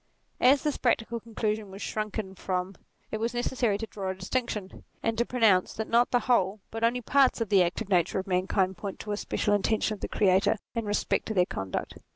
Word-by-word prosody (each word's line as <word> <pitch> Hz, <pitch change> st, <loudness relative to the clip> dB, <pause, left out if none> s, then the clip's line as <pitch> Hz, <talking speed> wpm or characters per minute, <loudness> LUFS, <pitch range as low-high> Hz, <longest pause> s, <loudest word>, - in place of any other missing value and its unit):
As 265 Hz, +2 st, +5 dB
this 300 Hz, -2 st, 0 dB
practical 235 Hz, -1 st, 0 dB
conclusion 215 Hz, -2 st, -3 dB
was 190 Hz, +1 st, -10 dB
shrunk 215 Hz, +1 st, -3 dB, 0.2 s
from, 185 Hz, 0 st, -2 dB, 0.4 s
it 220 Hz, -, -2 dB
was 230 Hz, +2 st, -2 dB
necessary 240 Hz, -3 st, 0 dB
to 225 Hz, -, -4 dB
draw 195 Hz, -3 st, -5 dB
a 190 Hz, -, -2 dB
distinction, 205 Hz, 0 st, -3 dB, 0.2 s
and 225 Hz, 0 st, +1 dB
to 235 Hz, +1 st, 0 dB
pronounce 220 Hz, -7 st, +3 dB
that 220 Hz, -, -4 dB
not 235 Hz, +1 st, +3 dB
the 245 Hz, -, +2 dB
whole, 210 Hz, -4 st, +2 dB
but 225 Hz, +1 st, -5 dB
only 240 Hz, +2 st, +2 dB
parts 265 Hz, +2 st, +3 dB
of 225 Hz, -3 st, -2 dB
the 195 Hz, -3 st, +5 dB
active 180 Hz, +5 st, -1 dB
nature 180 Hz, -2 st, +2 dB
of 190 Hz, -, -2 dB
mankind 185 Hz, 0 st, 0 dB
point 200 Hz, -2 st, -5 dB
to 210 Hz, -, -5 dB
a 205 Hz, -, -1 dB
special 210 Hz, 0 st, 0 dB
intention 215 Hz, +1 st, +1 dB
of 210 Hz, -, -8 dB
the -, -, -3 dB
Creator 195 Hz, +2 st, +3 dB, 0.2 s
in 230 Hz, -2 st, -2 dB
respect 205 Hz, 0 st, 0 dB
to 220 Hz, -, -3 dB
their 180 Hz, -1 st, +4 dB
conduct. 95 Hz, -, -5 dB
215 Hz, 210 wpm, -28 LUFS, 190-230 Hz, 0.4 s, As